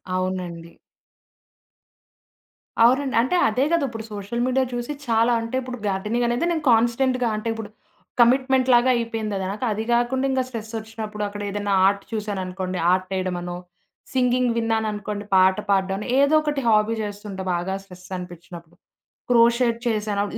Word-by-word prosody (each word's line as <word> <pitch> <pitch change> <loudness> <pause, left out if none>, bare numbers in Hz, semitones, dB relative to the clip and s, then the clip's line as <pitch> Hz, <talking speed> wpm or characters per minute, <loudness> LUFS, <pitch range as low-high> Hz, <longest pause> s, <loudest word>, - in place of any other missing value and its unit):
అవునండి. 180 -2 -3 2.1
అవునండి. 260 +3 +3
అంటే 260 +9 0
అదే 250 +5 +1
గదా! 335 -3 +2
ఇప్పుడు 225 -2 -7
సోషల్ 205 +4 -4
మీడియా 260 +1 +2
చూసి 240 +3 -3 0.2
చాలా 230 +1 +3
అంటే 230 +2 -4
ఇప్పుడు 250 -1 -6
గార్డెనింగనేది 235 - 0
నేను 320 -2 -2
కాన్స్టెంట్‌గా 240 +2 +2
అంటే 215 +2 -4
ఇప్పుడు 225 -2 -7 0.5
కమిట్మెంట్‌లాగా 255 0 +4
అయిపోయిందది 220 -4 -2
నాకు. 210 +5 -3
అది 215 +1 -2
గాకుండా 240 +3 +1
ఇంగ 260 0 +1
స్ట్రెస్సొచ్చినప్పుడు 220 -2 -6
అక్కడ 205 0 -7
ఏదైనా 205 0 -2
ఆర్ట్ 200 0 0
చూసాననుకోండి 190 -4 -3
ఆర్టేయడమనో. 185 -1 -2 0.6
సింగింగ్ 250 -1 +2
విన్నాననుకోండి 215 -2 -2
పాట 190 0 +5
పాడడం 195 -1 +2
అని 210 - -6
ఏదో 280 +2 +4
ఒకటి 295 -2 -2
హాబీ 215 0 +3
చేస్తుంటా 205 -2 -6
బాగా 175 +2 -2
స్ట్రెస్సనిపిచినప్పుడు. 180 -2 -10 0.6
క్రోషేడ్ 235 0 +4
చేశాను. 210 -2 0
ఆహ్, 205 - -7
220 Hz, 125 wpm, -23 LUFS, 195-240 Hz, 2.1 s, పాట